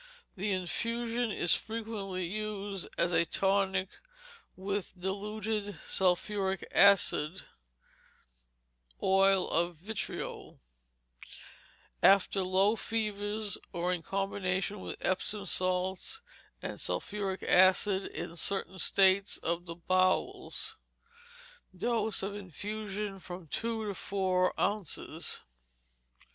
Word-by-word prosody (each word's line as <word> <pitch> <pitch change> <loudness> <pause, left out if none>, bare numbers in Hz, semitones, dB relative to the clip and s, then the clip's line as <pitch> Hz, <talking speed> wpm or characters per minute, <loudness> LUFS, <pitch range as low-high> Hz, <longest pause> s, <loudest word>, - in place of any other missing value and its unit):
The 200 +1 -1
infusion 230 +5 0
is 175 -4 +2
frequently 215 -5 -3
used 205 0 -4
as 175 - +2
a 165 -1 +4
tonic 190 +2 +1 0.7
with 195 -1 -4
diluted 205 +2 -3
sulphuric 190 +1 0
acid 190 -3 +5 1.6
(oil 195 0 +4
of 170 +1 +1
vitriol), 200 +7 -5 1.4
after 195 0 +5
low 190 +4 +3
fevers, 210 -2 -2
or 175 +1 0
in 175 - -2
combination 195 +1 -1
with - - -6
Epsom 200 +2 -1
salts 185 - -1 0.4
and - - -4
sulphuric 195 -2 -2
acid 190 +1 +5
in 165 - -6
certain 190 +1 0
states 195 +1 +4
of 170 +1 -2
the 170 - -5
bowels. 185 +2 +1 1.0
Dose 220 0 0
of 200 +1 -2
infusion, 205 +1 -5
from 180 -1 -8
two 225 +7 -2
to 205 - -2
four 185 -2 0
ounces. 205 -5 -2
195 Hz, 95 wpm, -31 LUFS, 185-210 Hz, 1.6 s, acid